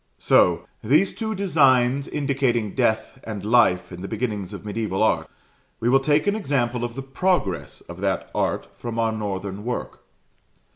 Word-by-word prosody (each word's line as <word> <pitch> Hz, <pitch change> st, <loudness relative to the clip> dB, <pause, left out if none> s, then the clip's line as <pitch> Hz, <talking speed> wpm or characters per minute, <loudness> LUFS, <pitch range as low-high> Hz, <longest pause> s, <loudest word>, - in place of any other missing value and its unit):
So, -, -, +3 dB, 0.2 s
these 155 Hz, -, +3 dB
two 220 Hz, -1 st, -3 dB
designs 140 Hz, -8 st, +3 dB
indicating 130 Hz, -7 st, 0 dB
Death 120 Hz, 0 st, 0 dB
and 105 Hz, -3 st, -6 dB
Life 110 Hz, -6 st, +3 dB
in 90 Hz, 0 st, -8 dB
the 95 Hz, -, -5 dB
beginnings 105 Hz, -4 st, -3 dB
of 105 Hz, 0 st, -8 dB
mediaeval 105 Hz, -1 st, -1 dB
art, 110 Hz, -, +1 dB, 0.5 s
we 115 Hz, -, +1 dB
will 135 Hz, +2 st, +5 dB
take 145 Hz, +2 st, +2 dB
an 205 Hz, 0 st, +2 dB
example 125 Hz, -, -1 dB
of 120 Hz, -1 st, -4 dB
the 135 Hz, -, -5 dB
progress 135 Hz, -, -1 dB
of -, -, -11 dB
that -, -, -1 dB
art -, -, -1 dB
from 115 Hz, -1 st, -6 dB
our 115 Hz, -1 st, +2 dB
northern 100 Hz, -2 st, -4 dB
work. 125 Hz, +2 st, -4 dB
120 Hz, 160 wpm, -23 LUFS, 105-140 Hz, 0.5 s, will